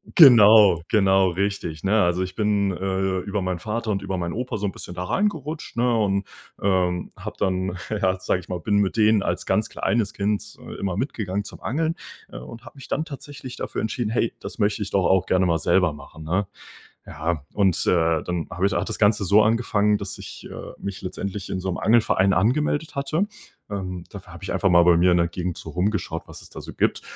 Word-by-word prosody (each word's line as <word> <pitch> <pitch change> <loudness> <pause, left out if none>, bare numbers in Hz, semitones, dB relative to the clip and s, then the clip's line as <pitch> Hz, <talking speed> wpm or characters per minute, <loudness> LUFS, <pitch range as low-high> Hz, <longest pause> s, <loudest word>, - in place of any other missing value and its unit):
genau, 110 - +8
genau 95 -2 +4
richtig. 90 -4 -3
Ne, 105 +2 +3
also, 90 +1 +1
ich 95 0 -6
bin, 105 -2 +1
äh, 95 0 -1
über 100 +2 -3
meinen 90 -1 -2
Vater 110 +3 -3
und 100 -2 -1
über 95 - -3
meinen 85 -1 -3
Opa 125 -1 -3
so 105 - -3
'n 100 - -1
bisschen 90 - -9
da 90 - -3
reingerutscht, 160 - -2
ne 120 0 +2
und, 100 -2 0 0.3
ähm, 90 -2 0
habe - - -7
dann, 95 -1 -1
ja, 95 -3 0
sage 90 - 0
ich 90 - -14
mal, 90 -1 -3
bin 105 +2 0
mit 100 +1 +1
denen 110 -1 +4
als - - -2
ganz - - 0
kleines 110 -3 -1
Kind, 105 +1 -2
äh, - - -9
immer 95 -2 -2
mitgegangen 105 -5 -2
zum - - -10
Angeln, 160 +6 -1 0.4
äh, - - -8
und 110 - -10
habe 115 - -13
mich 135 - -11
dann 155 - -1
tatsächlich 140 -3 -9
dafür - - -4
entschieden: 110 +1 -2
„Hey, 115 0 0
das - - -8
möchte 105 0 0
ich 100 - -4
doch 95 -2 +2
auch 95 -1 +3
gerne 95 0 +3
mal 85 -2 +1
selber 90 -1 +2
machen“, 75 +2 -12
ne? 90 +5 -1 0.6
Ja, 80 -1 -3
und, 95 -4 +2
äh, 80 -2 +2
dann 90 -2 -3
habe 90 +3 -1
ich 100 - +2
hat - - -1
das 110 - -4
Ganze 105 -1 +3
so 100 +4 +5
angefangen, 105 -2 +2
dass 100 0 -6
ich, - - -9
äh, - - -8
mich 100 -1 -5
letztendlich 100 +1 -5
in 95 - -2
so 95 - -5
'nem 90 - -2
Angelverein 110 -4 +3
angemeldet 145 - +1
hatte. 155 +8 0 0.4
Ähm, 95 -3 -5
dafür - - -11
habe - - -12
ich - - -3
einfach 95 - +2
mal 85 -1 +6
bei 85 -1 +5
mir 90 +2 +4
in 90 - +4
der 85 0 +2
Gegend 90 0 -4
so - - -8
rumgeschaut, 90 -3 -1
was - - -11
es - - -12
da - - -9
so - - -9
gibt. - - 0
100 Hz, 220 wpm, -23 LUFS, 90-110 Hz, 0.6 s, genau